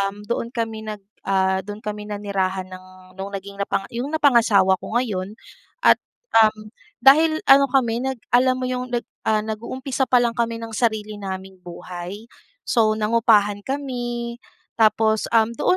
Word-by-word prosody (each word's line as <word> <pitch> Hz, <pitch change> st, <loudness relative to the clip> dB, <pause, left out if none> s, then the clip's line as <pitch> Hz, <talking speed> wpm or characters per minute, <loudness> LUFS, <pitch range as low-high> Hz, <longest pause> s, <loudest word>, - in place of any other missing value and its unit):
um, 195 Hz, +1 st, -3 dB
doon 235 Hz, 0 st, -2 dB
kami 225 Hz, -2 st, -3 dB
nag 210 Hz, -2 st, -6 dB, 0.2 s
ah, 190 Hz, -1 st, +2 dB
doon 205 Hz, +2 st, -8 dB
kami 210 Hz, 0 st, -5 dB
nanirahan 195 Hz, -2 st, -2 dB
ng 185 Hz, 0 st, -11 dB, 0.3 s
nung 195 Hz, -, -4 dB
naging 200 Hz, +1 st, -10 dB
napanga 195 Hz, 0 st, -1 dB
yung 240 Hz, +4 st, -3 dB
napangasawa 225 Hz, -10 st, +4 dB
ko 225 Hz, -, -5 dB
ngayon 205 Hz, -5 st, -2 dB, 0.5 s
at, -, -, +6 dB, 0.4 s
um, 215 Hz, -1 st, +3 dB, 0.3 s
dahil 310 Hz, +4 st, +6 dB
ano 275 Hz, +1 st, +8 dB
kami 240 Hz, -3 st, +1 dB
nag 265 Hz, 0 st, -2 dB, 0.2 s
alam 255 Hz, +1 st, +4 dB
mo 255 Hz, -, -3 dB
yung 250 Hz, 0 st, -3 dB
nag 240 Hz, -1 st, -2 dB, 0.2 s
ah, 215 Hz, -1 st, +2 dB
nag-uumpisa 255 Hz, +5 st, -3 dB
pa 250 Hz, -1 st, +4 dB
lang 235 Hz, -, +1 dB
kami 230 Hz, -1 st, 0 dB
ng 225 Hz, -, -7 dB
sarili 215 Hz, -2 st, -1 dB
naming 190 Hz, -1 st, -7 dB
buhay. 180 Hz, +3 st, -8 dB, 0.5 s
So, 220 Hz, -3 st, +3 dB
nangupahan 210 Hz, -2 st, +3 dB
kami, 240 Hz, -4 st, -4 dB, 0.4 s
tapos, 220 Hz, -1 st, +3 dB
um, 225 Hz, 0 st, +4 dB
doon 300 Hz, +9 st, +1 dB
220 Hz, 155 wpm, -22 LUFS, 200-240 Hz, 0.5 s, ano